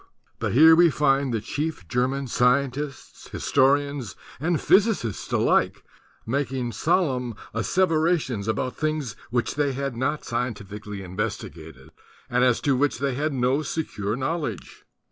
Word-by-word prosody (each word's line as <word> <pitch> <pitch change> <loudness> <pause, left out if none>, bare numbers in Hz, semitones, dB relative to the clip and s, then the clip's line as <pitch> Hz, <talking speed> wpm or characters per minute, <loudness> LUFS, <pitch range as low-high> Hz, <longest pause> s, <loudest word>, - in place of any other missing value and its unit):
But - - -1
here 160 +5 +8
we 170 +1 +6
find 140 -2 +2
the 115 - 0
chief 145 - -4
German 130 +7 0
scientists, 135 +3 -1
historians 140 -4 +1 0.2
and 160 +2 0
physicists 190 - +2
alike, - - +2 0.4
making 130 -1 -2
solemn 130 - 0 0.2
asseverations 155 - +1
about 110 +4 -1
things 155 -7 -2
which 120 +1 -1
they 145 -2 0
had 135 -1 -3
not 130 +5 -2
scientifically 105 -4 -4
investigated 90 - -6 0.4
and 125 0 +3
as 125 -2 +3
to 140 -2 +2
which 135 -1 +1
they 135 +1 -1
had 150 +4 -1
no 130 +2 +1
secure 110 -10 -3
knowledge. 150 +5 -4
130 Hz, 125 wpm, -25 LUFS, 115-150 Hz, 0.4 s, here